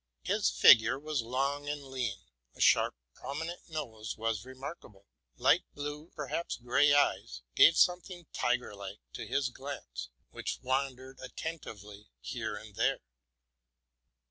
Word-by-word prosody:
His - - +2
figure 110 - +7
was 150 -1 -2
long 140 +5 -1
and 145 -1 -3
lean; 125 -8 -3 0.3
a - - -18
sharp, - - +4 0.2
prominent 160 +6 -6
nose 110 -9 -5
was 110 -2 -1
remarkable; 130 - -9 0.3
light - - +4
blue, 145 +2 -5
perhaps 170 - -3
gray, 125 +4 +3
eyes 65 - +2
gave - - +7
something 180 0 +2
tiger 125 -3 0
like 100 0 -7 0.2
to 110 - -6
his 135 +3 +1
glance, 70 - -7 0.2
which - - -4
wandered 130 0 -2
attentively 105 -9 -7
here 110 -4 -4
and 105 0 -10
there. - - +1
130 Hz, 125 wpm, -31 LUFS, 110-145 Hz, 0.3 s, figure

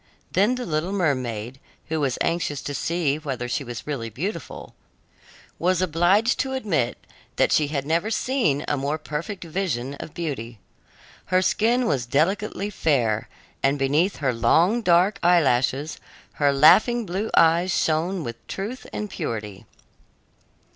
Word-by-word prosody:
Then 210 +7 +3
the 250 -1 -4
little 160 +2 -1
mermaid, 130 - -1 0.3
who 160 0 -1
was 135 -4 0
anxious 165 -4 -1
to 145 - -4
see 155 0 0
whether 135 -5 -4
she 125 - -2
was 120 -3 -7
really 135 -6 -4
beautiful, 185 - -6 0.9
was 180 0 +2
obliged 185 - +2
to 265 -1 -1
admit 185 - -1 0.4
that - - +2
she 150 - +3
had 140 -2 -3
never 170 +7 0
seen 225 - 0
a 145 - 0
more 140 +3 -1
perfect 165 +6 -5
vision 155 -7 -3
of 155 - -9
beauty. 130 -9 -4 0.7
Her 185 0 +2
skin 240 +6 +2
was 130 - 0
delicately 195 - 0
fair, 120 - 0 0.3
and 135 +2 +2
beneath 150 +8 +1
her 135 -4 -1
long, 165 - +3
dark 185 +1 +3
eyelashes 150 -4 +2 0.3
her 145 -1 +2
laughing 215 - +5
blue 195 +4 -3
eyes 170 +3 +4
shone 170 +3 0
with 115 -2 -8
truth 215 +7 -5
and 210 - -4
purity. 110 - -5
160 Hz, 140 wpm, -24 LUFS, 135-190 Hz, 0.9 s, laughing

